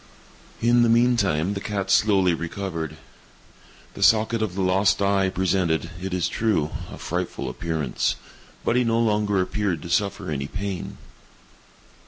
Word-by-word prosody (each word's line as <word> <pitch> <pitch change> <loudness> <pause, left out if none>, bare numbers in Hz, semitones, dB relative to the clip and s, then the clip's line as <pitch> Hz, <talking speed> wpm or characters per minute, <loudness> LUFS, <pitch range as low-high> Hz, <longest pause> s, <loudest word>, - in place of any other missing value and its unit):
In 120 +1 +5
the 120 - +4
meantime 105 -8 +2
the 100 - -4
cat 100 -2 -2
slowly 100 -3 +4
recovered. 85 -2 -4 1.0
The - - -9
socket 110 +1 +4
of 105 -5 -2
the 95 - -1
lost 95 +2 +3
eye 100 -1 +2
presented, 95 -3 0
it 95 0 -4
is 90 -2 0
true, 90 -6 0 0.2
a - - -8
frightful - - -3
appearance, 80 -6 -2 0.5
but - - +2
he 125 - +3
no 115 -1 +1
longer 105 -3 +1
appeared 90 -3 -1
to 85 - -7
suffer 100 -2 0
any 70 -1 -3
pain. 95 +2 -5
95 Hz, 145 wpm, -24 LUFS, 85-105 Hz, 1.0 s, In